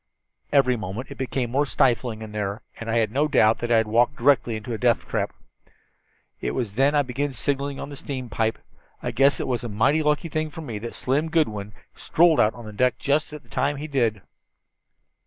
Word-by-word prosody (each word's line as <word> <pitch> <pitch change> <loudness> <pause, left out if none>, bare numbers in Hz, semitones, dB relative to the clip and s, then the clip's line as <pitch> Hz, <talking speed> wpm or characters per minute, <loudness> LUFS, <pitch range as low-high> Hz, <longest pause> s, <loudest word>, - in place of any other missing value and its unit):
"Every 130 -3 +4
moment 110 +3 -6
it - - -9
became 125 -2 -2
more 140 +3 +1
stifling 120 -4 +1
in 110 - -8
there, 105 +1 -3 0.2
and 115 - -6
I 115 - 0
had 110 -2 +2
no 145 +5 +2
doubt 110 -6 +4
that 120 0 -3
I 115 - +6
had 110 - +3
walked 120 +6 +2
directly 125 -3 +3
into 110 +2 -5
a - - -2
death 120 -1 +2
trap. - - -1 1.1
It - - -3
was 115 -6 -2
then 135 +6 +3
I 145 - +4
began 135 +2 -3
signaling 140 +2 -2
on - - -6
the 145 - -8
steam 130 -2 -5
pipe. 110 0 -1 0.5
I - - -1
guess 135 +2 +3
it - - -2
was 125 -2 -1
a 120 - -4
mighty 115 +9 +2
lucky 150 +2 +1
thing 155 0 -2
for 160 - -8
me 115 -9 -5
that 115 +2 -7
Slim 145 +5 0
Goodwin 105 -11 0 0.2
strolled 165 -1 +3
out 110 +1 +3
on 110 -3 -9
deck 125 +3 +2
just 150 +2 0
at 150 0 -9
the - - -26
time 145 +1 0
he 145 - -5
did." 120 -9 0
125 Hz, 215 wpm, -24 LUFS, 110-145 Hz, 1.1 s, I